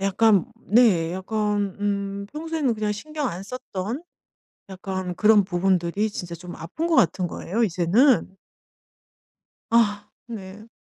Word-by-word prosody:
약간 195 0 +3
네. 195 -7 +3
약간 205 0 -1
음 200 -1 -2
평소에는 310 -4 -1
그냥 215 -1 -1
신경 300 +5 -4
안 180 +3 -6
썼던 225 - -5 0.7
약간 185 -1 -4
그런 215 -1 +5
부분들이 185 +2 0
진짜 175 -4 -6
좀 175 +1 -9
아픈 170 - -4
것 340 - +1
같은 180 +2 +3
거예요 225 +9 -1
이제는. 195 - +3 1.3
아 210 -3 +2 0.2
네. 210 -1 -9
205 Hz, 230 characters per minute, -24 LUFS, 185-225 Hz, 1.3 s, 그런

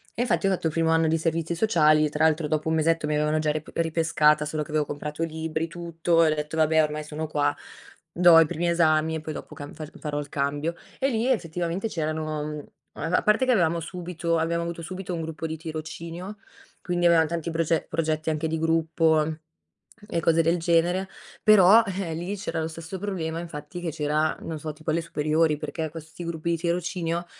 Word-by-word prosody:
E - - -1
infatti 245 -4 +1
ho 195 - +3
fatto 175 -3 0
il 155 - -3
primo 165 -1 +2
anno 165 0 +3
di 160 +1 +2
servizi 165 +1 -1
sociali, 155 -6 +4
tra 150 +2 +1
l'altro 155 -1 +2
dopo 155 +1 -1
1 160 - +2
mesetto 160 0 +1
mi 150 - 0
avevano 150 +1 +1
già 155 -1 +1
rip 155 +1 -5
ripescata, 160 -2 +2
solo 150 0 -3
che - - -6
avevo 150 -1 +1
comprato 150 +3 -4
libri, 160 0 -2
tutto 170 0 +1
e 155 - +4
ho - - 0
detto: 150 +1 -4
"Vabbè 160 0 +4
ormai 150 0 -2
sono 155 +1 -5
qua 145 -1 0 0.6
do 175 -2 +7
i 165 - +6
primi 170 +3 -1
esami 160 -2 +2
e 160 - -4
poi 155 0 -5
dopo 150 - -9
camb 145 -1 -8
fac 155 0 -9
farò 150 -1 -3
il 145 -1 -6
cambio." 145 +4 -1 0.2
E 270 - +2
lì 225 -1 0
effettivamente 175 -3 -1
c'erano 155 -3 -2
mhmm, 150 0 -4 0.4
uhm 165 +4 -1
a - - +2
parte 215 +5 +3
che 255 - +3
avevamo 170 -4 +2
subito 170 0 -3
abbiamo 170 +1 0
avuto 170 0 -5
subito 185 +1 -5
un 165 - -3
gruppo 160 0 -4
di 160 - -5
tirocinio, 165 +4 -7 0.4
quindi 175 -1 +1
avevam 165 -1 +5
tanti 170 +1 -3
proce 165 0 0
progetti 160 -1 -1
anche 155 +1 -1
di 160 0 -2
gruppo 160 -1 +2 0.8
e 170 - 0
cose 165 0 +3
del 165 +2 +2
genere, 175 +3 +1 0.4
però 215 +1 +7
eh, 190 -3 -3
lì 175 +5 -4
c'era 175 -4 -4
lo 160 - -1
stesso 165 +3 -7
problema, 165 -5 -3
infatti 170 +1 -7
che 170 - -2
c'era, 155 0 0
non 160 -2 -5
so 155 0 -5
tipo 155 +1 -7
alle 165 - +1
superiori, 155 -1 +1
perché 155 +1 -4
questi 160 +2 -9
gruppi 170 0 -3
di 170 - +1
tirocinio 170 0 -2
160 Hz, 210 wpm, -25 LUFS, 155-170 Hz, 0.8 s, do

